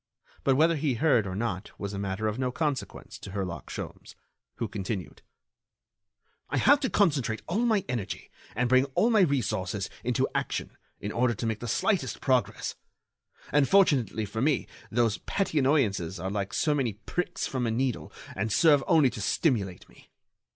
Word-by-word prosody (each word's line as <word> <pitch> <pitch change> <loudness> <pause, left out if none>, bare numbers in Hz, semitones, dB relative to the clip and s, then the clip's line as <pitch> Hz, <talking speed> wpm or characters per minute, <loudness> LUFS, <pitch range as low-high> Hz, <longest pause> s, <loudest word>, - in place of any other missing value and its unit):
But 135 - +3
whether 160 +3 +4
he 140 -3 0
heard 120 -5 +3
or 95 - -4
not 100 -2 -4
was 100 0 -4
a 100 - -4
matter 100 +2 -2
of 105 +3 -2
no 130 -1 0
consequence 150 -1 -3
to 95 - -9
Herlock 95 -4 -4
Sholmes, - - -7 0.4
who 115 - -2
continued: 100 -2 -5 1.3
"I - - -1
have 285 +1 +5
to 265 -3 -1
concentrate 140 - +1
all 210 +8 0
my 215 -4 +2
energy 120 -6 -4 0.2
and 125 +3 +1
bring 130 +2 +4
all 235 - +4
my 220 - +5
resources 105 - 0
into 125 +2 +1
action - - -2 0.2
in 105 - -4
order 120 0 +1
to 115 - -4
make 110 -1 -1
the 120 - -5
slightest 140 - 0
progress. 130 -5 0 0.8
And, 145 -1 +3
fortunately 140 - +3
for 110 +3 -4
me, 140 -1 +2 0.2
those 115 -5 +1
petty 190 - -1
annoyances 105 - +1
are 95 +2 -3
like 100 -1 -2
so 150 - +1
many 130 -7 0
pricks 175 - -3
from 125 -3 -1
a - - 0
needle 125 +2 -1 0.2
and 110 - -1
serve 150 +2 +5
only 150 -6 +5
to 105 - -6
stimulate 100 - 0
me. - - -20
125 Hz, 170 wpm, -28 LUFS, 105-150 Hz, 1.3 s, have